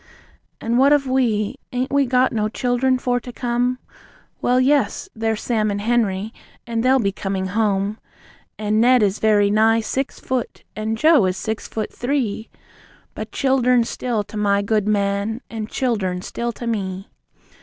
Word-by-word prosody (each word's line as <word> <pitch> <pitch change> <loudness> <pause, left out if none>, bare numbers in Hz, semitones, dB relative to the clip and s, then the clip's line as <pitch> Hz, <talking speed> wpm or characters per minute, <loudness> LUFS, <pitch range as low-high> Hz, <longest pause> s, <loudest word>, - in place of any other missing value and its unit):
And 235 +2 0
what 280 +2 +6
of 290 -2 +2
we? 245 -4 0
And 250 -1 0
ain't 265 - -6
we 280 -1 +3
got 255 +1 +2
no 215 -1 0
childern 250 +2 +1
for 245 -1 0
to 245 - -9
come? 245 +1 -1 0.6
Well, 250 +1 +3
yes! 285 +8 +2
There's 225 -1 -2
Sam 220 -3 0
and 205 0 -2
Henery, 215 -2 0 0.3
and 230 -1 -2
they'll 260 +2 +4
be 200 -6 +1
coming 195 -1 -3
home. 205 0 0 0.6
And 215 +1 +1
Ned 250 -1 +5
is 200 0 +1
very 205 -2 +3
nigh 225 +2 +4
six 265 +5 -3
foot, 255 -3 -3
and 220 +1 -2
Joe 305 - +5
is 185 0 -2
six 220 +2 -4
foot 215 -1 -4
three! 245 -5 -2 0.6
But - - -7
childern 250 -2 +2
still 230 -2 -2
to 215 - -9
my 200 -1 +2
good 210 0 0
man, 200 +2 0
and 220 -1 -5
childern 190 -8 -1
still 235 +3 -3
to 235 - -8
me! 195 -4 -3
225 Hz, 165 wpm, -21 LUFS, 210-250 Hz, 0.6 s, what